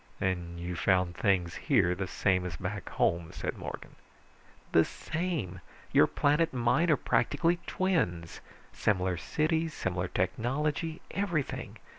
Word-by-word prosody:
"And 85 Hz, -2 st, -2 dB
you 90 Hz, +1 st, -4 dB
found 90 Hz, +1 st, +2 dB
things 90 Hz, -3 st, +1 dB
here 105 Hz, -, +3 dB
the 95 Hz, +1 st, -3 dB
same 90 Hz, 0 st, +1 dB
as 90 Hz, -3 st, -4 dB
back -, -, -4 dB
home," 85 Hz, -1 st, +1 dB
said -, -, -4 dB
Morgan. -, -, -8 dB, 0.7 s
"The 80 Hz, -, +6 dB
same! 155 Hz, -, -3 dB, 0.3 s
Your -, -, +6 dB
planet 150 Hz, +3 st, +2 dB
and 125 Hz, -, -2 dB
mine 160 Hz, +9 st, +3 dB
are 155 Hz, -, +5 dB
practically 170 Hz, +1 st, +1 dB
twins. 90 Hz, -, 0 dB, 0.3 s
Similar 95 Hz, -3 st, +1 dB
cities, 160 Hz, -, 0 dB
similar 90 Hz, 0 st, -1 dB
technology, 145 Hz, -, -1 dB
everything. 175 Hz, -8 st, -2 dB
95 Hz, 130 wpm, -30 LUFS, -, 0.7 s, The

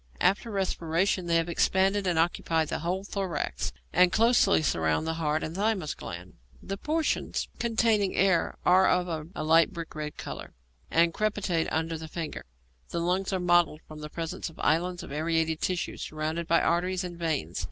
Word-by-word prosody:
After 195 Hz, +6 st, +2 dB
respiration 185 Hz, -2 st, 0 dB
they 165 Hz, 0 st, +3 dB
expand 190 Hz, +3 st, +2 dB
and 185 Hz, -5 st, 0 dB
occupy 165 Hz, -1 st, +1 dB
the -, -, -3 dB
whole 180 Hz, +4 st, -2 dB
thorax, 185 Hz, -, -3 dB, 0.2 s
and 180 Hz, -1 st, +5 dB
closely 220 Hz, -5 st, +4 dB
surround 80 Hz, -, +1 dB
the 160 Hz, -, -1 dB
heart 155 Hz, 0 st, 0 dB
and 160 Hz, -, -4 dB
thymus 200 Hz, -6 st, 0 dB
gland. 90 Hz, +2 st, -8 dB, 0.3 s
The 195 Hz, -, -5 dB
portions 310 Hz, +8 st, -1 dB
containing 225 Hz, -4 st, +2 dB
air 190 Hz, -3 st, +2 dB
are 185 Hz, +1 st, +6 dB
of 170 Hz, -3 st, -1 dB
a -, -, -3 dB
light 165 Hz, +4 st, +4 dB
brick 165 Hz, -2 st, -7 dB
red 150 Hz, -1 st, -5 dB
colour, -, -, -7 dB, 0.3 s
and 165 Hz, 0 st, +3 dB
crepitate 200 Hz, -6 st, 0 dB
under 160 Hz, 0 st, -1 dB
the 160 Hz, -, -7 dB
finger. 160 Hz, -1 st, -5 dB, 0.4 s
The 170 Hz, -, -2 dB
lungs 180 Hz, +3 st, 0 dB
are 190 Hz, -, 0 dB
mottled 175 Hz, -3 st, +3 dB
from 155 Hz, -1 st, -10 dB
the 150 Hz, 0 st, -7 dB
presence 165 Hz, +1 st, -4 dB
of 165 Hz, -, -17 dB
islands 175 Hz, +3 st, +1 dB
of 175 Hz, -, -9 dB
aerated 160 Hz, +1 st, 0 dB
tissue, 180 Hz, -1 st, -2 dB
surrounded 155 Hz, +2 st, -3 dB
by 170 Hz, 0 st, +4 dB
arteries 180 Hz, +2 st, +1 dB
and 175 Hz, -1 st, -6 dB
veins. 155 Hz, -, -2 dB
170 Hz, 170 wpm, -28 LUFS, 160-190 Hz, 0.4 s, are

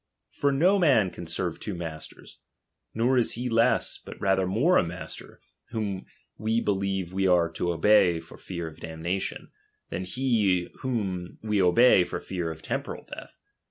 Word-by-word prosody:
For 140 Hz, -, +1 dB
no 180 Hz, +9 st, +4 dB
man 120 Hz, -, +4 dB
can 85 Hz, -, -8 dB
serve 85 Hz, 0 st, -3 dB
two 105 Hz, -, -4 dB
masters; 80 Hz, -3 st, -9 dB, 0.6 s
nor 125 Hz, +3 st, +3 dB
is 120 Hz, -, +1 dB
he 125 Hz, +2 st, -3 dB
less, 115 Hz, 0 st, +2 dB
but -, -, -10 dB
rather 95 Hz, -1 st, +2 dB
more 130 Hz, -, +3 dB
a -, -, +2 dB
master, 85 Hz, +1 st, -8 dB, 0.3 s
whom 105 Hz, -5 st, -3 dB, 0.3 s
we 110 Hz, +2 st, +1 dB
believe 95 Hz, -4 st, -1 dB
we 95 Hz, 0 st, +1 dB
are 85 Hz, -2 st, +3 dB
to 85 Hz, +1 st, -1 dB
obey 85 Hz, 0 st, +4 dB
for 80 Hz, -, -13 dB
fear 85 Hz, -2 st, -5 dB
of 80 Hz, 0 st, -9 dB
damnation, 80 Hz, +4 st, -4 dB, 0.4 s
than 95 Hz, -, -3 dB
he 105 Hz, -6 st, +1 dB
whom 95 Hz, -9 st, -3 dB
we 105 Hz, -2 st, +1 dB
obey 95 Hz, +2 st, +6 dB
for 90 Hz, -, -4 dB
fear 90 Hz, -3 st, -4 dB
of 80 Hz, -1 st, -8 dB
temporal -, -, -4 dB
death. -, -, -10 dB
95 Hz, 160 wpm, -27 LUFS, 85-115 Hz, 0.6 s, obey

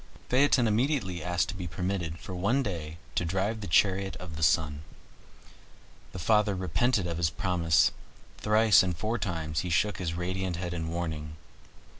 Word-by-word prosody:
Phaeton 130 Hz, -1 st, +4 dB
immediately 110 Hz, -, 0 dB
asked 90 Hz, -1 st, 0 dB
to -, -, -4 dB
be 90 Hz, -2 st, -5 dB
permitted 85 Hz, 0 st, -3 dB
for 95 Hz, 0 st, -8 dB
one 105 Hz, +10 st, +1 dB
day 80 Hz, -7 st, -5 dB, 0.2 s
to -, -, 0 dB
drive 95 Hz, +6 st, -1 dB
the 100 Hz, -, -5 dB
chariot 95 Hz, +2 st, +2 dB
of 85 Hz, -3 st, -8 dB
the 80 Hz, -, -6 dB
sun. 75 Hz, -2 st, +2 dB, 1.3 s
The -, -, -8 dB
father 105 Hz, +3 st, +2 dB
repented 95 Hz, +4 st, +1 dB
of 85 Hz, -1 st, -3 dB
his 85 Hz, -2 st, +2 dB
promise; 85 Hz, -3 st, +2 dB, 0.5 s
thrice 110 Hz, -1 st, +5 dB
and 90 Hz, -3 st, -2 dB
four 110 Hz, +5 st, -2 dB
times 80 Hz, -4 st, -2 dB
he 90 Hz, -, -3 dB
shook 95 Hz, +4 st, +1 dB
his 85 Hz, -3 st, -2 dB
radiant 90 Hz, +1 st, -2 dB
head 90 Hz, 0 st, -4 dB
in 80 Hz, -2 st, -3 dB
warning. 80 Hz, -3 st, -4 dB
90 Hz, 165 wpm, -29 LUFS, 85-105 Hz, 1.3 s, thrice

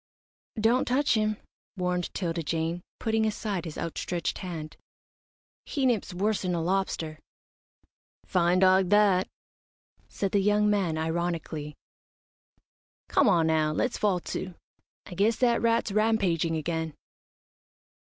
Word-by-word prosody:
"Don't 230 Hz, +4 st, +3 dB
touch 280 Hz, +4 st, +2 dB
him," 215 Hz, -1 st, +1 dB, 0.4 s
warned 180 Hz, -1 st, -1 dB
'Tilda 170 Hz, -3 st, -2 dB
Jane, 165 Hz, +2 st, -2 dB, 0.2 s
putting 220 Hz, 0 st, +1 dB
aside 205 Hz, -4 st, -3 dB
his 160 Hz, -, -7 dB
outstretched 170 Hz, +1 st, -3 dB
hand. 165 Hz, -5 st, -6 dB, 0.9 s
"He 275 Hz, -3 st, -2 dB
nips 235 Hz, -6 st, +1 dB
worse'n 190 Hz, -1 st, 0 dB
a -, -, -1 dB
lobster." 170 Hz, -4 st, -1 dB, 1.1 s
"Fine 180 Hz, -1 st, +2 dB
dog 185 Hz, 0 st, +4 dB
that," 200 Hz, -3 st, +4 dB, 0.8 s
said 195 Hz, -2 st, -3 dB
the 200 Hz, -, +3 dB
young 210 Hz, +1 st, +3 dB
man, 195 Hz, -6 st, +1 dB
ironically. 160 Hz, -2 st, -3 dB, 1.3 s
"Come -, -, +4 dB
on 165 Hz, -2 st, +3 dB
now, 155 Hz, -1 st, +2 dB
let's 245 Hz, +10 st, -1 dB
fall 200 Hz, -4 st, +2 dB
to. 185 Hz, -1 st, -4 dB, 0.5 s
I -, -, -9 dB
guess 205 Hz, +5 st, +2 dB
that 240 Hz, -1 st, +2 dB
rat's 230 Hz, -2 st, +2 dB
rampaging 195 Hz, -6 st, +1 dB
again." 160 Hz, 0 st, -3 dB
185 Hz, 120 wpm, -27 LUFS, 165-210 Hz, 1.3 s, dog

